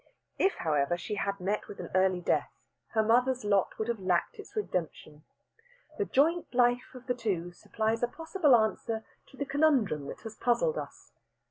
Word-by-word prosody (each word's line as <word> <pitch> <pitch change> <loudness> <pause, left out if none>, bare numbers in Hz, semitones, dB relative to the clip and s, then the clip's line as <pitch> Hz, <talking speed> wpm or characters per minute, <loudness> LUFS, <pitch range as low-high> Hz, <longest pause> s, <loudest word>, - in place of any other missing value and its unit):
If, 385 - +3
however, 150 +1 +1
she 175 - -5
had 200 -1 -2
met 200 +3 -2
with - - -10
an - - -7
early 185 -1 +3
death, - - +1 0.5
her 220 - +4
mother's 250 +2 +2
lot 200 -2 +2
would 220 - -2
have 235 -2 -1
lacked 185 - 0
its 415 - -11
redemption. 165 - -4 0.7
The 415 - +2
joint 330 +4 +2
life 245 +1 +2
of 255 0 -11
the 250 - 0
two 195 -8 -2
supplies 220 +5 -2
a 240 - +2
possible 325 0 +2
answer 220 0 0 0.2
to 270 - -17
the 280 - -2
conundrum 270 - +2
that - - -8
has 220 -1 -8
puzzled 465 - +1
us. - - -10
225 Hz, 175 wpm, -30 LUFS, 185-260 Hz, 0.7 s, her